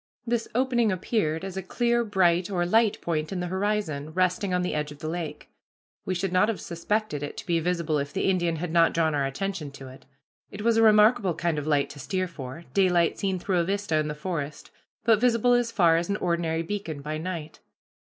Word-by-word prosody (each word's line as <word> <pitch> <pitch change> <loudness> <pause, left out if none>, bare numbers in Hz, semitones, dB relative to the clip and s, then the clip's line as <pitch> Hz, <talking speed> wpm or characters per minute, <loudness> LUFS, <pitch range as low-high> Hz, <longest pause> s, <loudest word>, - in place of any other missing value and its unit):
This 235 -1 -1
opening 240 -3 +2
appeared 185 -3 -1
as 190 -1 -6
a 190 - -2
clear 235 +5 +1
bright, 180 -4 +2
or 175 -3 0
light, 220 +3 +3
point 155 -1 -2
in 190 - -2
the 180 - -2
horizon, 190 -6 -1
resting 185 +2 +1
on 180 0 +1
the 180 - -2
edge 150 0 -2
of 145 - -10
the 155 - -6
lake. 165 -1 -5 0.6
We 185 - -1
should 185 +1 -2
not 185 +4 +4
have 225 - -2
suspected 170 -1 -2
it 145 - -6
to - - -7
be 170 -2 +1
visible 170 -3 0
if 140 0 -4
the - - -1
Indian 175 -3 +1
had 165 +1 -4
not 165 0 +4
drawn 160 -2 +2
our 140 -2 +1
attention 170 +2 -4
to 135 -1 -10
it. 130 - -15 0.4
It 210 - -7
was 230 0 +3
a - - +5
remarkable 210 -4 +5
kind 170 -2 -1
of 150 - -6
light 145 -2 +1
to 145 - -11
steer 185 +7 -2
for 140 -2 -8
daylight 180 -4 +3
seen 190 -2 0
through 180 0 0
a - - +2
vista 195 -2 -1
in 155 -1 0
the 150 - -4
forest 150 -2 -5 0.3
but 225 -2 +4
visible 245 0 +3
as 245 -1 +2
far 170 -6 +4
as 170 +2 -2
an 200 - 0
ordinary 170 -2 -1
beacon 165 -6 -5
by 155 +1 -3
night. 165 -2 -6
175 Hz, 220 wpm, -26 LUFS, 155-200 Hz, 0.6 s, a